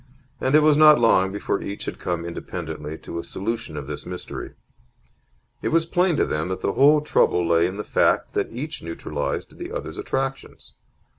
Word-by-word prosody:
And 130 +3 +2
it 155 - +6
was 150 -1 +5
not 150 -3 +8
long 95 -5 +4
before 100 - -2
each 100 +1 -5
had - - -5
come 85 -1 -2
independently 80 -2 -6
to 85 - -7
a - - -5
solution 110 -5 -4
of 70 - -5
this 75 0 -5
mystery. 90 0 -7 1.1
It - - -2
was 165 0 +2
plain 175 -1 +2
to - - +3
them 75 +2 -2
that 95 0 -4
the 100 - 0
whole 150 +2 +5
trouble 90 - +2
lay 85 0 +4
in 95 +2 -6
the 105 - -3
fact - - +1
that - - -1
each 140 +7 -5
neutralized 80 -3 -4
the - - -6
other's - - -5
attractions. 135 0 -4
100 Hz, 190 wpm, -23 LUFS, -, 1.1 s, not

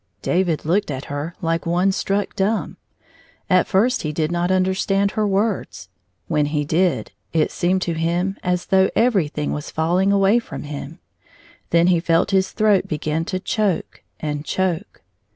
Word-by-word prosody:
David 175 -4 0
looked 190 +5 +1
at 135 -1 -4
her 150 +4 -4
like 165 0 -1
one 180 +3 +2
struck 195 +1 -1
dumb. 210 +3 -1 0.7
At 185 0 +4
first 230 +7 +2
he 155 - -2
did 155 +1 -1
not 175 +1 0
understand 190 +1 +1
her 215 -1 0
words; 205 +3 -1 0.4
when 150 -3 +1
he 150 0 -1
did, 175 +4 +1 0.2
it 160 -2 +2
seemed 185 +1 0
to 170 - -1
him 170 +4 -1
as 180 -1 -1
though 190 0 +3
everjiihing 180 -11 +1
was 150 0 -4
falling 175 +5 +1
away 200 +3 +4
fi 235 - -10
om - - -5
him. 145 +1 -7 0.7
Then 170 0 +4
he 180 -1 +4
felt 165 +2 +1
his 190 -1 +2
throat 210 -3 +2
begin 155 0 -2
to 185 - -2
choke 205 -2 -1 0.2
and 150 -1 -3
choke. 185 +3 -2
180 Hz, 165 wpm, -21 LUFS, 160-195 Hz, 0.7 s, At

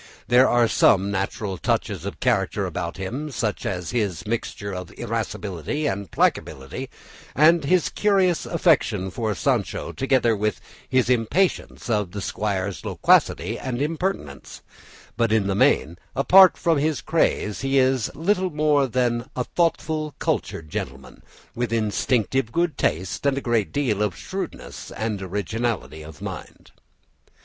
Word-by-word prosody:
There 125 +2 +6
are 120 -1 +4
some 100 -2 +3
natural 95 -1 -3
touches - - -1
of - - -6
character - - +1
about 85 +1 -4
him, 125 +11 -4
such 110 -5 -2
as 90 -2 -3
his 100 -8 -1
mixture 105 -2 -3
of 90 -1 -6
irascibility 115 - -3
and 100 - -2
placability, 65 0 -1 0.5
and 160 +4 +5
his 175 +4 +2
curious 190 -4 +2
affection 125 - +2
for 110 -1 -2
Sancho 85 - -1
together 130 -4 +2
with 105 +1 -1 0.3
his 130 -2 +2
impatience 125 - 0
of 105 -6 0
the 105 - -4
squire's 100 -1 -2
loquacity 110 +7 +2
and 125 -2 -3
impertinence; 155 - -3 0.5
but 115 -2 +2
in 110 -2 +3
the 100 - 0
main, 85 -3 +2 0.2
apart 185 +7 +7
from 165 -4 +2
his 155 0 0
craze, 105 -10 0
he 135 +1 +1
is 130 -3 +2
little 185 +3 +1
more 150 -3 +2
than 120 0 0
a 125 - 0
thoughtful, 155 -1 -1
cultured 80 - -2
gentleman, 65 -3 -6 0.3
with 120 -1 -2
instinctive 115 +2 0
good 170 +2 0
taste 90 +3 -1
and 135 -1 +2
a - - +1
great 120 -6 0
deal 125 -8 0
of 105 -4 -1
shrewdness - - -6
and 110 -2 -3
originality 100 - -3
of 75 -1 -11
mind. - - -8
115 Hz, 140 wpm, -23 LUFS, 100-140 Hz, 0.5 s, apart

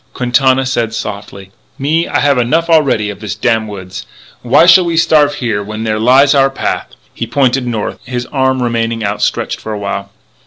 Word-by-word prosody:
Quintana 130 +1 +2
said 120 -4 -2
softly: 100 -2 -7 0.3
"Me, 155 +5 0
I - - 0
have 140 -2 +2
enough 165 +8 0
already 135 -10 +2
of 100 - -11
this 105 -1 -5
damn 110 0 0
woods. 95 -2 -8 0.3
Why 130 +7 +4
shall 180 +1 +6
we 170 -1 -1
starve 150 -3 +3
here 115 -6 -2
when 110 +2 -6
there 110 -1 -1
lies 130 +5 +4
our 135 -1 +3
path?" 135 - -4 0.2
He 115 - -5
pointed 130 0 0
north; 110 -3 -3
his 125 -1 -4
arm 130 -2 +1
remained 115 -1 -2
outstretched 100 0 -2
for 110 - -6
a - - -4
while. 100 -1 -4
120 Hz, 185 wpm, -13 LUFS, 110-135 Hz, 0.3 s, shall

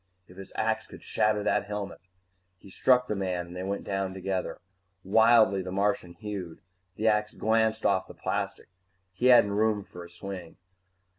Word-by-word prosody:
If 90 - -16
his 95 - -10
axe - - -1
could - - -13
shatter 105 -1 +1
that - - +1
helmet 105 -2 -5 0.6
He 95 - -15
struck 125 +4 +3
the 105 - -1
man 90 -3 -2
and 85 +1 -11
they 90 - -4
went 100 +1 -3
down 95 -1 -2
together. 95 0 -3 0.4
Wildly, 110 -1 +5
the 90 0 -6
Martian 95 -3 0
hewed. 100 -4 -6 0.4
The 110 +3 -1
axe 105 -1 +1
glanced 110 0 +1
off 95 - +2
the - - -12
plastic - - -3 0.4
he 120 +7 +1
hadn't 120 -5 +7
had 100 - -1
room 110 -2 +2
for 90 -2 -11
a 85 - -12
swing. 90 -1 -8
100 Hz, 175 wpm, -28 LUFS, 95-110 Hz, 0.6 s, hadn't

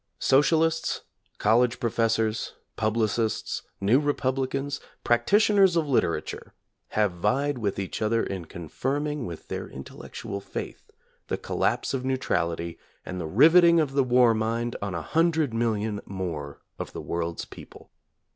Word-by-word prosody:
Socialists, 160 +4 +2 0.4
college 120 +3 +3
professors, 115 -1 0 0.2
publicists, 110 0 0 0.2
new 110 +7 +4
republicans, 135 -1 -1 0.2
practitioners 195 - +4
of 165 -3 +1
litera 85 - +1
ture, - - -9 0.4
have 105 -2 +3
vied 125 +10 0
with 100 -4 -1
each 100 +2 -4
other 115 +1 +2
in 95 -3 -4
confirming 135 - -3
with 85 -2 -8
their - - -5
intellectual 100 +8 -7
faith - - -7 0.4
the - - -1
collapse - - -1
of 130 -1 -2
neutrality 85 -10 -1 0.3
and 90 0 -5
the 80 - -4
riveting 165 - +6
of 150 -4 +1
the 140 -1 +3
war 125 -2 +5
mind 115 +2 -1
on 100 -3 -3
a 85 - -3
hundred 160 - +1
million 110 -2 -1
more 85 -7 -5 0.2
of - - -5
the - - -5
world's 85 0 -3
people. - - -13
115 Hz, 135 wpm, -26 LUFS, 100-140 Hz, 0.4 s, riveting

